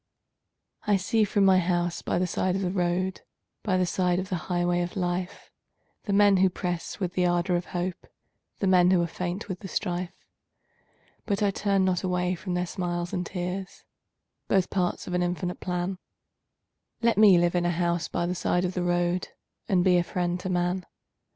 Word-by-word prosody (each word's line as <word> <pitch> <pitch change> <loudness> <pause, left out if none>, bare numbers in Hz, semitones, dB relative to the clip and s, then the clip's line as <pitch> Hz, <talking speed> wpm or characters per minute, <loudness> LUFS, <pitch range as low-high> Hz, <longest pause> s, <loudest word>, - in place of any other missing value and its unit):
I 205 -1 +4
see 215 +4 +1
from 200 -1 +2
my 190 -1 +6
house 175 -1 0
by - - -1
the 185 - +1
side 185 +1 0
of 195 - -1
the 180 - 0
road 185 0 -1 0.4
By 185 -3 +1
the 185 - +2
side 180 0 +1
of 185 +1 -3
the 185 - -1
highway 175 0 +1
of 175 0 -4
life, 180 0 -3 0.5
The 205 - -2
men 200 -1 +5
who 190 0 +4
press 175 0 -4
with 180 -3 -2
the 180 -1 +2
ardor 175 +1 +1
of 175 0 -1
hope, 180 0 -4 0.5
The - - -2
men 180 -1 +5
who 185 -1 +4
are - - +1
faint 180 +4 -4
with 185 -2 -5
the 195 - -7
strife, 180 -2 -3 1.1
But 205 -1 0
I 200 - +3
turn 195 -1 +1
not 180 -2 +1
away 180 -1 0
from 185 0 -4
their 180 0 0
smiles 175 -1 -3
and 180 -2 -1
tears, 185 +1 -5 0.6
Both 190 -2 +2
parts 180 -2 -1
of 180 - -5
an 180 - +1
infinite 180 0 -2
plan 180 +1 -3 1.0
Let 230 -3 +3
me 205 -4 +8
live 175 0 +2
in 175 -1 +1
a - - +2
house 170 0 0
by 170 - -2
the 180 - -1
side 175 0 0
of 180 - -2
the 180 - -2
road 175 0 0 0.4
And 180 -2 +3
be 180 -1 +4
a - - +1
friend 175 0 -2
to 185 - -4
man. 180 0 -1
180 Hz, 195 wpm, -27 LUFS, 175-190 Hz, 1.1 s, me